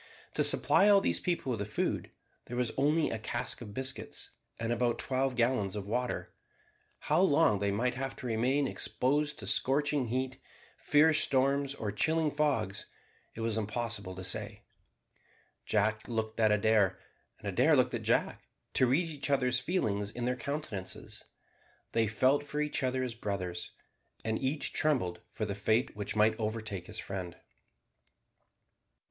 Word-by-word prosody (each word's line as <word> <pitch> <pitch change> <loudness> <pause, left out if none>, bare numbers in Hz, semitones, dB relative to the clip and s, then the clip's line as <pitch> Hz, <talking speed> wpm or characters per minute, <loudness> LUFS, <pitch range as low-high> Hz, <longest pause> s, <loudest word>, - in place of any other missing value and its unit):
To - - +2
supply 205 - +5
all 200 -1 +7
these - - +1
people 170 -7 -1
with 105 0 -5
food, - - -1 0.4
there 120 - -6
was 125 -2 0
only 150 +4 +2
a 110 - -3
cask 120 +3 -2
of 105 -3 -9
biscuits 130 0 -4 0.3
and 115 0 -2
about 120 0 +1
twelve 130 0 0
gallons 120 -5 +1
of 100 -2 -4
water. 125 +4 -2 0.7
How - - +2
long 150 - +4
they 100 0 0
might 125 +5 0
have 135 +1 -4
to - - -9
remain 125 +5 +1
exposed 145 +4 0
to 105 - -7
scorching 140 +5 +1
heat, 130 +2 -2 0.3
fierce 155 +1 +4
storms, 140 +1 +2
or 105 -6 -3
chilling 155 +8 +1
fogs, 135 -10 0 0.5
it 115 - -6
was 115 -1 0
impossible 110 -3 -3
to 95 - -7
say. 105 +2 -2 1.0
Jack 110 +1 +1
looked 110 -1 -3
at 110 -1 +4
Adair, 105 -2 +3 0.4
and - - -9
Adair - - +4
looked - - +2
at - - -2
Jack, - - 0 0.3
to 130 - +4
read 155 +8 +2
each 145 -3 -3
other's 125 -3 +2
feelings 105 - -1
in 120 +3 -4
their 125 +1 0
countenances. 125 -9 -5 0.7
They 115 -1 +2
felt 130 +7 +2
for 145 +1 -4
each 150 0 0
other 130 0 0
as 125 -2 -3
brothers, 90 -6 -4 0.6
and 110 0 0
each 135 +3 -1
trembled 125 - 0
for 110 - -3
the 100 - -3
fate 110 +5 0
which 105 0 -4
might 110 +1 +4
overtake 110 -4 -4
his - - -5
friend. 90 -3 -5
120 Hz, 155 wpm, -31 LUFS, 105-140 Hz, 1.0 s, all